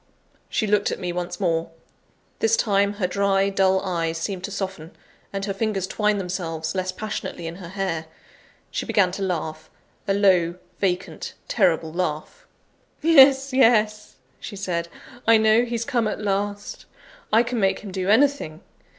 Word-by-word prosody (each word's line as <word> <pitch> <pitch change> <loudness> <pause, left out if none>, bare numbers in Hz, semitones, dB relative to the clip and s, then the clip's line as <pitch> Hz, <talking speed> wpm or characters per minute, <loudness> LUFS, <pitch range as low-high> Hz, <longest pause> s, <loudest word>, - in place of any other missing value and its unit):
She 220 - 0
looked 205 -1 +2
at - - -3
me 180 -2 -4
once 175 0 -4
more. 165 -4 0 0.7
This 225 0 +3
time, 200 -1 +2
her 205 -2 -2
dry, 195 +1 +1
dull 190 -1 +3
eyes 165 -4 -2
seemed 180 +2 -4
to - - -6
soften, 190 -5 -5 0.4
and 195 0 -3
her 200 - -2
fingers 195 -2 -1
twined 210 +1 0
themselves 165 -4 -3
less 185 -1 -1
passionately 205 -4 -5
in 165 +1 -6
her 185 -3 -9
hair. 185 -4 -3 0.6
She - - -3
began 190 -3 +3
to 195 - -6
laugh 160 -4 -3 0.4
a 195 - +2
low, 180 -4 +3 0.2
vacant, 180 -2 -2
terrible 165 -6 +1
laugh. 180 - -4 0.6
"Yes, 275 -4 +6
yes," 215 -4 +3 0.2
she - - -8
said, 180 -4 -2 0.4
"I 230 0 +7
know 220 +2 +4
he's 235 -1 -3
come 240 -5 0
at 210 - -3
last; 205 0 -3 0.4
I 225 +2 +5
can 245 0 -3
make 195 -2 +1
him 205 - -8
do 185 0 -2
anything. 230 - +2
195 Hz, 160 wpm, -23 LUFS, 180-215 Hz, 0.7 s, I